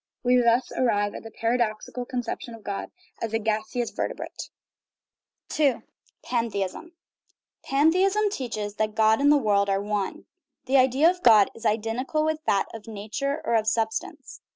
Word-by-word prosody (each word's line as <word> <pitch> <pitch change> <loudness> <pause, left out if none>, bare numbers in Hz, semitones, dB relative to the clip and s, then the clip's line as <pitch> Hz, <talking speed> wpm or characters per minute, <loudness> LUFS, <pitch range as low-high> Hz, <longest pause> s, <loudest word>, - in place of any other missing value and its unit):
We 250 0 +4
thus 235 +1 +2
arrive 205 -5 +1
at - - -7
the 225 - -10
paradoxical 230 +1 -2
conception 245 -2 -5
of 220 - -15
God 200 -1 -4 0.3
as 225 -1 -3
a - - +3
gaseous 220 +2 -2
vertebrate. - - -5 1.1
II. 280 -5 +2 0.4
PANTHEISM 230 - -3 0.7
Pantheism 375 +9 +3
teaches 215 - -4
that 215 -1 -1
God 220 +2 +4
and 285 +1 +5
the 295 - +6
world 200 -5 +2
are 195 0 +2
one. 205 -1 -3 0.4
The 265 +1 +3
idea 265 +4 +4
of 360 +1 +1
God 215 - +6
is 230 0 -3
identical 230 +8 -1
with 315 0 0
that 195 - +3
of 225 -1 -9
nature 225 +8 -4
or 225 -2 +2
sub 220 0 0
stance. - - -7
230 Hz, 155 wpm, -25 LUFS, 215-270 Hz, 1.1 s, the